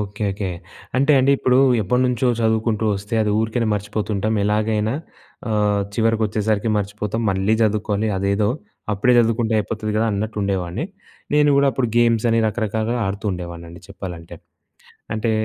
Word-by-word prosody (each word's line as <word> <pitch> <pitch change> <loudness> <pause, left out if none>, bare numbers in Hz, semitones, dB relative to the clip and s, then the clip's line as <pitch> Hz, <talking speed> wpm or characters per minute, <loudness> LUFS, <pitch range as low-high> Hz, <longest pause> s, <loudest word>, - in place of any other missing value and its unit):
Okay. 105 +1 -5
Okay. 95 -1 -4 0.5
అంటే 140 +3 +4
అండీ 130 +2 +3
ఇప్పుడూ, 130 0 +3 0.2
ఎప్పటనుంచో 125 +3 +1
చదువుకుంటూ 110 -1 +1
ఒస్తే 105 +3 -6
అది 105 - 0
ఊరికెనే 110 +1 0
మర్చిపోతుంటాం. 105 +1 -2
ఎలాగైనా 105 +2 0 0.5
ఆహ్, 105 -2 +1
చివరికొచ్చేసరికి 110 -1 +1
మర్చిపోతాం. 105 +2 -3
మళ్ళీ 95 +2 +1
జదువుకోవాలి. 105 0 0
అదేదో 100 +2 +1 0.4
అప్పుడే 105 +5 +2
చదువుకుంటే 115 -1 +2
అయిపోతది 110 +1 -3
గదా 115 +1 +2
అన్నట్టుండేవాడిని. 100 - -2 0.5
నేను 150 0 +4
గూడా 140 0 +4
అప్పుడు 125 -3 0
గేమ్సని 115 -1 +3
రకరకాలుగా 110 +2 -1
ఆడుతూ 100 +2 -4
ఉండేవాడినండి 85 -1 -8
చెప్పాలంటే. 90 -4 -8 0.8
అంటే, 110 +1 -1
110 Hz, 125 wpm, -21 LUFS, 100-115 Hz, 0.8 s, అంటే